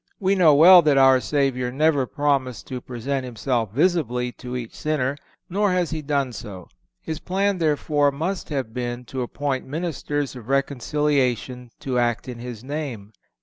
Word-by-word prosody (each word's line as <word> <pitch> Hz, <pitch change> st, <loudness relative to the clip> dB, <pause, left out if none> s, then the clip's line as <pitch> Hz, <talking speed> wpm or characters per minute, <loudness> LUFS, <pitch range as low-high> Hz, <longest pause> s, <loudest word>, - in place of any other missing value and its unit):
We 195 Hz, 0 st, +2 dB
know 170 Hz, -6 st, +5 dB
well 175 Hz, +4 st, +9 dB
that 150 Hz, -3 st, +3 dB
our 135 Hz, -1 st, +6 dB
Savior 130 Hz, -3 st, 0 dB
never 145 Hz, -1 st, +2 dB
promised 130 Hz, -7 st, -1 dB
to 125 Hz, -1 st, -5 dB
present 130 Hz, +3 st, -3 dB
Himself 120 Hz, -3 st, -2 dB
visibly 125 Hz, -, +1 dB
to 125 Hz, 0 st, -8 dB
each 120 Hz, -3 st, -5 dB
sinner, 145 Hz, -3 st, -1 dB, 0.3 s
nor 200 Hz, +1 st, +1 dB
has 180 Hz, -2 st, 0 dB
He 160 Hz, -1 st, -3 dB
done 140 Hz, -3 st, -1 dB
so. 95 Hz, -5 st, -9 dB, 0.4 s
His 160 Hz, -1 st, -4 dB
plan, 195 Hz, +1 st, 0 dB
therefore, 150 Hz, -2 st, +2 dB
must 170 Hz, +7 st, -3 dB
have 135 Hz, -7 st, -3 dB
been 120 Hz, 0 st, -4 dB
to 130 Hz, +2 st, -5 dB
appoint 135 Hz, +2 st, -3 dB
ministers 145 Hz, -2 st, -3 dB
of 120 Hz, -1 st, -10 dB
reconciliation 135 Hz, -2 st, 0 dB
to 130 Hz, -2 st, -1 dB
act 120 Hz, +1 st, 0 dB
in 125 Hz, -2 st, -7 dB
His 120 Hz, -2 st, -8 dB
name. 130 Hz, -8 st, -5 dB
135 Hz, 160 wpm, -23 LUFS, 125-150 Hz, 0.4 s, well